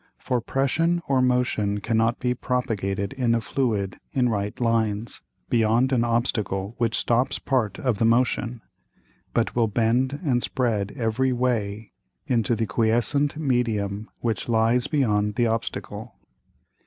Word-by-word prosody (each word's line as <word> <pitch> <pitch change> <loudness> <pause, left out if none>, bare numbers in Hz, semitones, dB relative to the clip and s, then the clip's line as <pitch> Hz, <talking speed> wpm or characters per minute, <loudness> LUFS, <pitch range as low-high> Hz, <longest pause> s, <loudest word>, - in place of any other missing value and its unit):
For 125 -2 -1
Pression 165 +8 0
or 135 -2 +3
Motion 125 -5 +1
cannot 115 +3 +1
be 125 -1 0
propagated 105 -5 -2
in 125 -4 +1
a - - +2
Fluid 110 -5 -1
in 125 -2 +2
right 105 0 -2
Lines, 115 -2 0 0.3
beyond 115 +3 +2
an 120 -3 +2
Obstacle 110 -4 -1
which 115 -2 +1
stops 120 +2 +1
part 120 -7 -1
of 120 -6 -1
the 115 - +3
Motion, 120 0 +1 0.7
but - - +1
will 115 -2 +3
bend 120 +6 +1
and 125 -4 +2
spread 110 -7 -1
every 125 +2 +1
way 115 -4 -1 0.3
into 120 -1 +1
the 115 0 0
quiescent 120 +7 +1
Medium 110 -7 -1
which 115 -2 -2
lies 115 +2 +2
beyond 105 -7 +1
the 120 - +2
Obstacle. 115 0 -3
115 Hz, 135 wpm, -24 LUFS, 110-125 Hz, 0.7 s, or